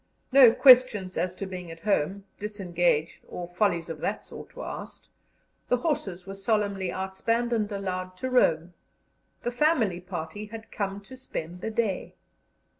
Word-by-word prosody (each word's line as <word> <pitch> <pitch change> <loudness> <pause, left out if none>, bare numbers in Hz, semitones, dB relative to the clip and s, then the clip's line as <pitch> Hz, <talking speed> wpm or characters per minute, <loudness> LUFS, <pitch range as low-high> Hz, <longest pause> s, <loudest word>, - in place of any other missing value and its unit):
No 260 -3 +9
questions 240 -8 +6
as 185 0 -1
to 195 - -5
being 180 -2 -7
at 165 0 -10
home, 200 -1 0 0.2
disengaged, 175 -6 0
or 175 -1 -6
follies 175 -2 0
of 165 -2 -6
that 200 +6 -3
sort, - - -11
were - - -6
asked; - - -8 0.6
the 250 - +4
horses 205 - -2
were 195 - -7
solemnly 195 -2 0
outspanned 230 +6 -1
and 215 -2 0
allowed 185 -2 -4
to 260 - -3
roam; 175 -8 +3 0.7
the 240 - -1
family 245 - +2
party 180 +3 -6
had 225 +1 -10
come 200 -1 -3
to 260 +6 -12
spend 180 -9 -6
the - - -2
day. 215 -4 -2
195 Hz, 155 wpm, -27 LUFS, 180-225 Hz, 0.7 s, No